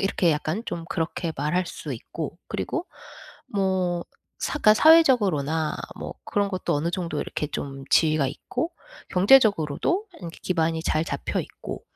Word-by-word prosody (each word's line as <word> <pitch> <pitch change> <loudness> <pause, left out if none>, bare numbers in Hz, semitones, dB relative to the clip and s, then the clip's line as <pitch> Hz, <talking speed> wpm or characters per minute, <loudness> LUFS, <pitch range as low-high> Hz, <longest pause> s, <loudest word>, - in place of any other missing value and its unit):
이렇게 180 -4 +2
약간 155 +8 -2
좀 165 - -4
그렇게 165 0 -2
말할 170 +6 0
수 - - -6
있고 - - -6
그리고 355 0 -3 0.6
뭐 185 -3 0 0.4
사 300 - -2
그러니까 215 -6 +6
사회적으로나 200 - +4 0.2
뭐 - - -6
그런 205 -1 0
것도 185 -2 -1
어느 150 +4 0
정도 170 -4 -3
이렇게 150 - -3
좀 135 -2 -5
지위가 155 -3 +4
있고 325 - -4 0.4
경제적으로도 205 - +4 0.2
이렇게 170 -2 -8
기반이 165 -2 0
잘 155 -1 +1
잡혀 - - -2
있고. - - -8
175 Hz, 320 characters per minute, -25 LUFS, 155-205 Hz, 0.6 s, 그러니까